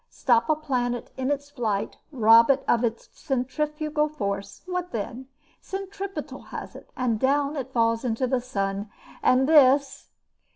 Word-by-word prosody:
"Stop 235 Hz, -1 st, +2 dB
a 310 Hz, -, +4 dB
planet 250 Hz, -5 st, -2 dB
in 260 Hz, 0 st, -2 dB
its 285 Hz, 0 st, -2 dB
flight, 220 Hz, -7 st, -2 dB
rob 230 Hz, -2 st, +6 dB
it 275 Hz, 0 st, +3 dB
of 235 Hz, 0 st, +3 dB
its 230 Hz, -1 st, -2 dB
centrifugal 300 Hz, +3 st, -1 dB
force, 200 Hz, -9 st, -4 dB
what 360 Hz, -1 st, -3 dB
then? 235 Hz, +4 st, -5 dB, 0.3 s
Centripetal 390 Hz, 0 st, -6 dB
has -, -, -8 dB
it, -, -, -12 dB
and 240 Hz, -5 st, 0 dB
down 280 Hz, +3 st, +1 dB
it 265 Hz, -2 st, -5 dB
falls 230 Hz, -1 st, +1 dB
into 245 Hz, +1 st, 0 dB
the 255 Hz, 0 st, 0 dB
sun! 200 Hz, -4 st, -3 dB, 0.3 s
And 260 Hz, +1 st, +4 dB
this 280 Hz, -2 st, +4 dB
260 Hz, 150 wpm, -25 LUFS, 230-295 Hz, 0.3 s, rob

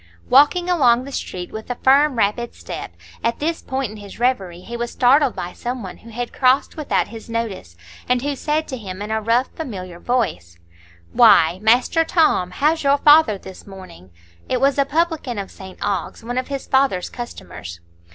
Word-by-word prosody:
Walking 295 Hz, +7 st, +5 dB
along 255 Hz, -9 st, +3 dB
the 275 Hz, -, -9 dB
street 180 Hz, -8 st, -5 dB
with 220 Hz, +2 st, -8 dB
a 245 Hz, -, -2 dB
firm, 275 Hz, +2 st, +4 dB
rapid 230 Hz, +2 st, -1 dB
step, -, -, -8 dB, 0.3 s
at 230 Hz, 0 st, 0 dB
this 325 Hz, +2 st, -2 dB
point 265 Hz, -4 st, -3 dB
in 215 Hz, -, -10 dB
his 205 Hz, -1 st, -11 dB
reverie 195 Hz, -9 st, 0 dB
he 235 Hz, +5 st, -8 dB
was 240 Hz, 0 st, -3 dB
startled 265 Hz, +2 st, +3 dB
by 175 Hz, +1 st, -5 dB
some 245 Hz, -1 st, -5 dB
one 185 Hz, -, -8 dB
who 230 Hz, -, -15 dB
had 240 Hz, +2 st, -5 dB
crossed 260 Hz, +1 st, +2 dB
without 305 Hz, -3 st, -1 dB
his 225 Hz, 0 st, -10 dB
notice, 220 Hz, -, -4 dB, 0.3 s
and 250 Hz, 0 st, +2 dB
who 285 Hz, 0 st, -1 dB
said 305 Hz, +3 st, -1 dB
to 260 Hz, -, -4 dB
him 190 Hz, -4 st, -8 dB
in 210 Hz, -, -6 dB
a 220 Hz, 0 st, 0 dB
rough, 230 Hz, +4 st, +1 dB
familiar 185 Hz, -, -7 dB
voice: 90 Hz, -, -2 dB, 0.6 s
"Why, 190 Hz, -7 st, +5 dB
Master 245 Hz, +9 st, +3 dB
Tom, 315 Hz, -, +2 dB
how's 305 Hz, -, +1 dB
your 280 Hz, 0 st, +3 dB
father 295 Hz, -7 st, +5 dB
this 190 Hz, 0 st, -12 dB
morning?" 185 Hz, -, -12 dB, 0.4 s
It 255 Hz, -, +1 dB
was 275 Hz, +2 st, +2 dB
a 280 Hz, -, +4 dB
publican 310 Hz, -5 st, -1 dB
of 200 Hz, -1 st, -5 dB
St 190 Hz, -1 st, -11 dB
Ogg's, 195 Hz, +1 st, -3 dB
one 245 Hz, +2 st, -2 dB
of 255 Hz, -, -5 dB
his 275 Hz, -1 st, -5 dB
father's 265 Hz, -9 st, +1 dB
customers. 90 Hz, -, -8 dB
240 Hz, 190 wpm, -20 LUFS, 195-275 Hz, 0.6 s, Walking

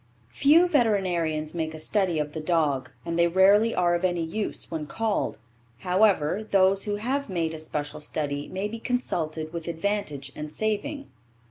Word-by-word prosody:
Few 320 Hz, +6 st, +5 dB
veterinarians 180 Hz, -, +1 dB
make 160 Hz, -2 st, -3 dB
a -, -, -7 dB
study 180 Hz, +1 st, +1 dB
of 150 Hz, -1 st, -2 dB
the 160 Hz, -, -4 dB
dog, 155 Hz, -5 st, +1 dB, 0.2 s
and 170 Hz, 0 st, -2 dB
they 170 Hz, -, +5 dB
rarely 200 Hz, +6 st, +4 dB
are 175 Hz, -1 st, +2 dB
of 175 Hz, -, -1 dB
any 175 Hz, -2 st, +1 dB
use 205 Hz, +6 st, -4 dB
when 155 Hz, -2 st, -4 dB
called. 215 Hz, -, -1 dB, 0.4 s
However, 190 Hz, 0 st, +2 dB
those 195 Hz, 0 st, +3 dB
who 205 Hz, -1 st, -1 dB
have 260 Hz, +6 st, -2 dB
made 165 Hz, -3 st, -1 dB
a 160 Hz, -, -6 dB
special 150 Hz, -1 st, -4 dB
study 145 Hz, -1 st, -3 dB
may 190 Hz, +2 st, -3 dB
be 225 Hz, +2 st, -7 dB
consulted 160 Hz, -11 st, -2 dB
with 170 Hz, -1 st, -5 dB
advantage 165 Hz, -6 st, -2 dB
and 150 Hz, 0 st, -6 dB
saving. 220 Hz, -, -2 dB
175 Hz, 165 wpm, -26 LUFS, 155-210 Hz, 0.4 s, Few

